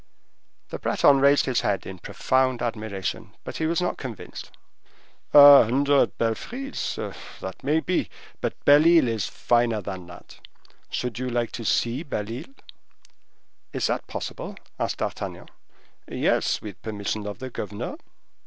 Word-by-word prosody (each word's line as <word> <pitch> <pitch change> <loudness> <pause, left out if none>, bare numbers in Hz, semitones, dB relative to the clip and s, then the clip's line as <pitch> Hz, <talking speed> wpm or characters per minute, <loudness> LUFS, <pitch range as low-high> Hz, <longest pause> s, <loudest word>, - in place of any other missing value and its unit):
The - - -6
Breton 140 -1 +4
raised 140 +1 +5
his 130 -2 +1
head 100 -2 -1
in 95 -1 -8
profound 130 +6 0
admiration, 110 -5 -4
but - - -6
he 160 - 0
was 170 +2 +1
not 180 - -2
convinced. 125 -6 -8 0.8
"A 145 -1 +10
hundred 140 +4 +2
belfries! 245 - -3
Ah, - - -4 0.3
that 95 - -7
may 150 +4 +2
be; 180 +1 -1 0.3
but - - -4
Belle 145 +3 +7
Isle 165 -6 +6
is 115 -3 -1
finer 120 -2 +1
than 95 -3 -7
that. 85 - -13 0.5
Should 125 -1 -3
you 130 0 -2
like 120 -1 -1
to 115 - -6
see 120 +4 +1
Belle 115 -9 -4
Isle?" 135 +2 -10 1.2
"Is - - -1
that - - -1
possible?" - - -6 0.2
asked - - -1
D'Artagnan. - - -5 0.6
"Yes, - - 0
with 105 -3 -9
permission 105 -1 -4
of 105 - -5
the 130 -1 -7
governor." 105 -2 -5
120 Hz, 145 wpm, -25 LUFS, 105-140 Hz, 1.2 s, A